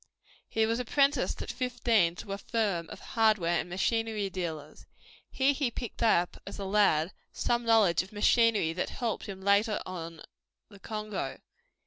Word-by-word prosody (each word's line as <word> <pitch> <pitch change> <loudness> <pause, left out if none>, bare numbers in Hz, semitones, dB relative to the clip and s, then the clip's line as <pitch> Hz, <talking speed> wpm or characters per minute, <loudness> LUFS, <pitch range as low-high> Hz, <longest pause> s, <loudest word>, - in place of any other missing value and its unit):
He 220 0 +2
was 230 +2 0
apprenticed 275 +3 +1
at - - -5
fifteen 235 -8 +1
to 195 - -6
a 200 - -5
firm 200 -7 -1
of - - -9
hardware 215 -7 +3
and - - -4
machinery 215 +2 -1
dealers. 160 -5 -6 0.4
Here 270 +2 +2
he 275 -2 0
picked 235 0 -7
up, 180 -6 +2
as - - -7
a 200 - -5
lad, 190 -4 +2 0.2
some 240 0 -1
knowledge 215 -7 +4
of 185 - -11
machinery 215 -4 +3
that 175 - -2
helped 235 -3 -3
him 190 -1 -7
later 205 +2 +3
on 165 -3 -7 0.5
the 200 -2 -15
Congo. 215 0 -4
210 Hz, 155 wpm, -29 LUFS, 180-230 Hz, 0.5 s, knowledge